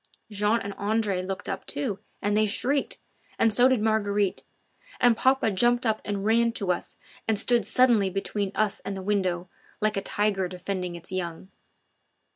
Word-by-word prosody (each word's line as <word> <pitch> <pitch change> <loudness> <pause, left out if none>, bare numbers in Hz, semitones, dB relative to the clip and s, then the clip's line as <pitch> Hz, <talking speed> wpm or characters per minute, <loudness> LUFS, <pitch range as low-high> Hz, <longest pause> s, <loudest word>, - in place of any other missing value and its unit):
Jean 210 +3 +2
and 200 0 -5
Andre 205 -2 0
looked 190 +1 -5
up, 195 -1 -3
too, 190 +7 -3 0.2
and 205 +1 +1
they 215 0 +3
shrieked, 270 +7 0 0.4
and 225 -1 +3
so 245 +3 +5
did 260 -3 +2
Marguerite, 205 -3 +1 0.6
and 245 -2 +5
papa 260 -1 +2
jumped 240 +5 +2
up 220 -1 +1
and 200 -1 -3
ran 230 +1 +3
to 200 -5 -1
us 180 - -4 0.3
and 220 -1 +2
stood 235 +3 +2
suddenly 235 -6 +4
between 195 +1 -2
us 215 -2 +1
and 195 0 -5
the 190 - -6
window 185 -3 0 0.3
like 215 -1 0
a - - 0
tiger 200 -2 0
defending 180 0 -4
its 170 +2 -10
young. 180 -1 -4
205 Hz, 170 wpm, -26 LUFS, 190-225 Hz, 0.6 s, so